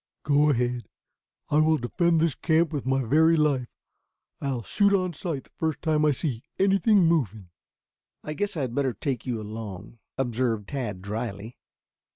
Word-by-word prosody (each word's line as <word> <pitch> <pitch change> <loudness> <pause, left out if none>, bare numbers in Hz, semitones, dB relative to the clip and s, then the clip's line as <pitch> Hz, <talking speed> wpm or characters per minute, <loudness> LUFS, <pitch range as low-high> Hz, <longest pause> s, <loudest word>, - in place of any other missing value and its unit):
"Go 145 +1 +3
ahead. 120 -4 0 0.6
I 150 - +4
will 155 0 +4
defend 165 +6 +1
this 160 -2 +2
camp 160 +3 +1
with 140 -3 -3
my 135 0 +2
very 160 +7 +4
life. 140 -5 +1 0.7
I'll 130 -4 -2
shoot 200 - +2
on 185 -2 0
sight 160 -4 -4
the - - -27
first 160 -3 -3
time 155 -2 +2
I - - +5
see 135 -4 -1 0.2
anything 195 0 +4
moving." 110 - 0 0.7
"I 150 - -4
guess 205 +2 -2
I - - -1
had 125 -3 -2
better 135 -1 0
take 130 +3 -3
you 120 -3 -1
along," 110 0 -8 0.2
observed 120 -4 -1
Tad 115 -10 -4
dryly. 110 +1 -5
140 Hz, 165 wpm, -26 LUFS, 120-160 Hz, 0.7 s, I